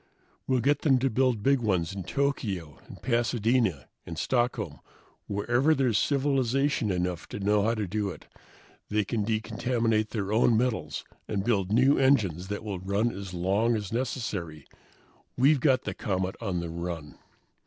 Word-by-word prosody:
We'll 130 Hz, -2 st, +2 dB
get 145 Hz, +3 st, +2 dB
them 135 Hz, -4 st, +3 dB
to 130 Hz, +1 st, 0 dB
build 125 Hz, -3 st, +1 dB
big 140 Hz, 0 st, +4 dB
ones 95 Hz, -6 st, 0 dB
in 100 Hz, -, -5 dB
Tokyo 100 Hz, -, -2 dB
and -, -, -11 dB
Pasadena 115 Hz, -, +1 dB, 0.2 s
and 85 Hz, -, -8 dB
Stockholm, 120 Hz, +6 st, -1 dB, 0.5 s
wherever 120 Hz, +9 st, +2 dB
there's 125 Hz, -7 st, +2 dB
civilization 135 Hz, -3 st, +1 dB
enough 90 Hz, -2 st, -2 dB
to -, -, -6 dB
know 105 Hz, +1 st, +2 dB
how 115 Hz, +3 st, +1 dB
to 110 Hz, -2 st, -2 dB
do 100 Hz, +2 st, -2 dB
it; -, -, -9 dB, 0.6 s
they 105 Hz, -1 st, +1 dB
can 110 Hz, +1 st, -1 dB
decontaminate 110 Hz, 0 st, 0 dB
their 105 Hz, -2 st, -2 dB
own 115 Hz, 0 st, +4 dB
metals 110 Hz, -, -1 dB, 0.2 s
and 100 Hz, -3 st, -1 dB
build 100 Hz, -5 st, +1 dB
new 130 Hz, +5 st, +4 dB
engines 105 Hz, -, +2 dB
that 105 Hz, +1 st, -4 dB
will 100 Hz, -4 st, -4 dB
run 100 Hz, +5 st, 0 dB
as 95 Hz, -2 st, -7 dB
long 100 Hz, +7 st, +1 dB
as 105 Hz, -1 st, -4 dB
necessary. 105 Hz, -, -3 dB, 0.7 s
We've 140 Hz, +3 st, +5 dB
got 130 Hz, -1 st, +3 dB
the -, -, -3 dB
comet 95 Hz, -5 st, -2 dB
on 95 Hz, -6 st, -2 dB
the 85 Hz, -, -5 dB
run!" 85 Hz, -3 st, -6 dB
110 Hz, 160 wpm, -28 LUFS, 95-125 Hz, 0.7 s, We've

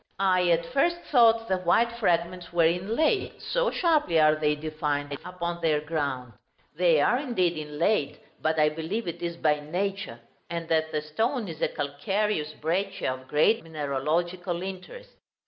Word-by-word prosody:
I 185 Hz, -2 st, +2 dB
at 170 Hz, 0 st, +2 dB
first 310 Hz, -, +1 dB
thought 230 Hz, -3 st, +5 dB
the 190 Hz, -3 st, 0 dB
white 185 Hz, +7 st, +3 dB
fragments 180 Hz, -6 st, -1 dB
were 170 Hz, -1 st, +3 dB
inlaid, 215 Hz, -, 0 dB
so -, -, 0 dB
sharply 305 Hz, -, +2 dB
are 155 Hz, 0 st, +6 dB
they 150 Hz, -1 st, +1 dB
defined 150 Hz, -2 st, -3 dB
upon 170 Hz, -1 st, -4 dB
their 155 Hz, -2 st, +2 dB
ground. 140 Hz, -6 st, -3 dB, 0.4 s
They 170 Hz, -2 st, +4 dB
are 240 Hz, -, +3 dB
indeed 205 Hz, -11 st, 0 dB
inlaid, 150 Hz, +3 st, -1 dB, 0.2 s
but 160 Hz, 0 st, 0 dB
I 150 Hz, 0 st, +5 dB
believe 165 Hz, +8 st, -4 dB
it 170 Hz, 0 st, -5 dB
is 170 Hz, -1 st, -3 dB
by 150 Hz, -2 st, +2 dB
nature; 180 Hz, -3 st, -3 dB, 0.3 s
and 170 Hz, -1 st, -4 dB
that 160 Hz, -1 st, +1 dB
the 150 Hz, -1 st, -2 dB
stone 225 Hz, -, -1 dB
is 160 Hz, -3 st, -8 dB
a -, -, +3 dB
calcareous 155 Hz, +3 st, -2 dB
breccia 180 Hz, -1 st, -1 dB
of 130 Hz, 0 st, -11 dB
great 215 Hz, +10 st, +3 dB
mineralogical 165 Hz, +4 st, -2 dB
interest. 195 Hz, -, -8 dB
170 Hz, 155 wpm, -27 LUFS, 155-195 Hz, 0.4 s, are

